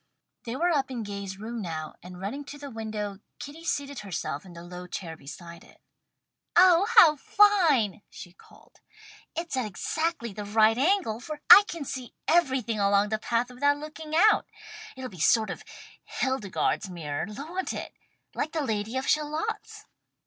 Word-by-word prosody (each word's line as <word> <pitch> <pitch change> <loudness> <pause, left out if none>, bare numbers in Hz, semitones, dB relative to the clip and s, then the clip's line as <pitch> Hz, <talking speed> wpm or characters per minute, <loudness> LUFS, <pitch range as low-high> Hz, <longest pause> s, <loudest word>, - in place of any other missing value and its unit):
They 235 +1 -4
were 345 +5 +1
up 275 -4 +1
in 245 -3 -4
Gay's 200 -2 -6
room 225 +3 -5
now, 160 -4 -5
and 180 0 -11
running 215 +10 -4
to 290 - -9
the 285 -1 -8
window, 215 -3 -5 0.2
Kitty 300 +4 -9
seated 285 -4 -2
herself 185 -5 -4
in 180 - -12
the 170 0 -10
low 180 +1 -9
chair 170 -2 -6
beside 170 +4 -11
it. - - -20 0.8
"Oh 360 +1 +6
how 315 -8 +9
fine!" 315 - +3
she 175 - -11
called. - - -21 0.6
"It's 335 -3 -3
at 255 -4 -1
exactly 270 - -2
the 210 - -6
right 215 +2 +4
angle, 280 - +1
for 300 +4 -7
I 405 - +11
can 330 -8 -5
see 255 -2 -6
everything 260 -10 +2
along 200 +1 +3
the 215 0 -1
path 235 +2 -1
without 285 +3 +2
looking 305 +1 -7
out. 420 +6 +5 0.5
It'll 260 -1 -6
be 190 - -12
a - - -6
sort 220 +5 +3
of - - -8 0.4
Hildegarde's 220 -5 -1
mirror, 155 -4 -4
won't 320 - -4
it! - - -6 0.4
Like 310 - -3
the 315 -2 -1
Lady 220 0 -2
of 260 - -3
Shalott's." 305 +1 -2
240 Hz, 170 wpm, -27 LUFS, 200-305 Hz, 0.8 s, I